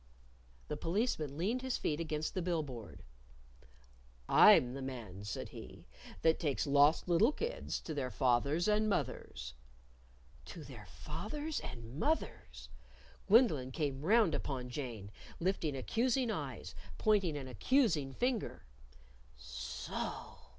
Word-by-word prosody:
The -, -, -3 dB
Policeman 165 Hz, -, -1 dB
leaned 215 Hz, +10 st, 0 dB
his 260 Hz, -1 st, -1 dB
feet 150 Hz, 0 st, -1 dB
against 155 Hz, -1 st, -2 dB
the 185 Hz, -, -1 dB
bill 170 Hz, -2 st, 0 dB
board. 120 Hz, -6 st, -9 dB, 1.2 s
"I'm 125 Hz, 0 st, +7 dB
the 135 Hz, -, -5 dB
man," 115 Hz, -8 st, -6 dB
said 105 Hz, -, -4 dB
he, -, -, -11 dB, 0.4 s
"that 160 Hz, 0 st, +4 dB
takes 145 Hz, -5 st, 0 dB
lost 145 Hz, +3 st, +4 dB
little 180 Hz, -, +4 dB
kids 465 Hz, +10 st, -3 dB
to 160 Hz, -, -5 dB
their 135 Hz, -4 st, -2 dB
fathers 140 Hz, -, +2 dB
and 215 Hz, 0 st, +3 dB
mothers." 130 Hz, -, -3 dB, 0.9 s
To -, -, -9 dB
their -, -, -11 dB
fathers 290 Hz, -, -5 dB
and 120 Hz, +3 st, -8 dB
mothers! 315 Hz, -, -2 dB, 0.6 s
Gwendolyn 190 Hz, -, +5 dB
came 140 Hz, -3 st, -2 dB
round 205 Hz, +1 st, +4 dB
upon 125 Hz, -3 st, -3 dB
Jane, 120 Hz, -8 st, -5 dB, 0.3 s
lifting 170 Hz, -5 st, 0 dB
accusing 240 Hz, -, +1 dB
eyes, 140 Hz, -, -5 dB, 0.2 s
pointing 195 Hz, -8 st, +2 dB
an 135 Hz, -2 st, -6 dB
accusing 155 Hz, -, +2 dB
finger, 245 Hz, -3 st, -1 dB, 0.7 s
"So!" -, -, -5 dB
155 Hz, 120 wpm, -34 LUFS, 130-210 Hz, 1.2 s, I'm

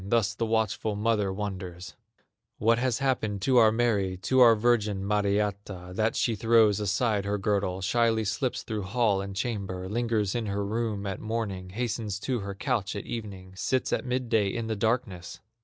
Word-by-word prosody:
Thus 105 Hz, +1 st, +1 dB
the 115 Hz, -, -2 dB
watchful 110 Hz, -1 st, 0 dB
mother 105 Hz, -2 st, +1 dB
wonders: 95 Hz, -3 st, -6 dB, 0.6 s
"What 115 Hz, +2 st, +3 dB
has 125 Hz, -2 st, +1 dB
happened 110 Hz, -7 st, -1 dB
to 130 Hz, +1 st, +3 dB
our 110 Hz, -2 st, +7 dB
Mary, 105 Hz, -5 st, +1 dB
To 130 Hz, -, +2 dB
our 120 Hz, -2 st, +8 dB
virgin, 105 Hz, -4 st, +1 dB
Mariatta, 100 Hz, -2 st, -1 dB
That 110 Hz, +3 st, 0 dB
she 115 Hz, -, +1 dB
throws 110 Hz, -2 st, +4 dB
aside 105 Hz, +1 st, 0 dB
her 100 Hz, +1 st, 0 dB
girdle, 95 Hz, -2 st, -1 dB
Shyly 110 Hz, +2 st, +2 dB
slips 110 Hz, +5 st, -1 dB
through 110 Hz, -2 st, -3 dB
hall 100 Hz, 0 st, +1 dB
and 100 Hz, 0 st, -6 dB
chamber, 95 Hz, -4 st, -3 dB
Lingers 110 Hz, -2 st, 0 dB
in 115 Hz, -3 st, -2 dB
her 100 Hz, 0 st, -2 dB
room 110 Hz, -1 st, -2 dB
at 95 Hz, -1 st, -3 dB
morning, 110 Hz, -5 st, -3 dB
Hastens 110 Hz, -1 st, -3 dB
to 130 Hz, -3 st, -1 dB
her 100 Hz, -1 st, -5 dB
couch 105 Hz, -3 st, -1 dB
at 100 Hz, -, -5 dB
evening, 100 Hz, -5 st, -7 dB
Sits 130 Hz, +6 st, -1 dB
at -, -, 0 dB
midday 120 Hz, -4 st, 0 dB
in 115 Hz, +4 st, -3 dB
the 110 Hz, 0 st, -2 dB
darkness?" 105 Hz, -5 st, -2 dB
105 Hz, 175 wpm, -27 LUFS, 100-115 Hz, 0.6 s, our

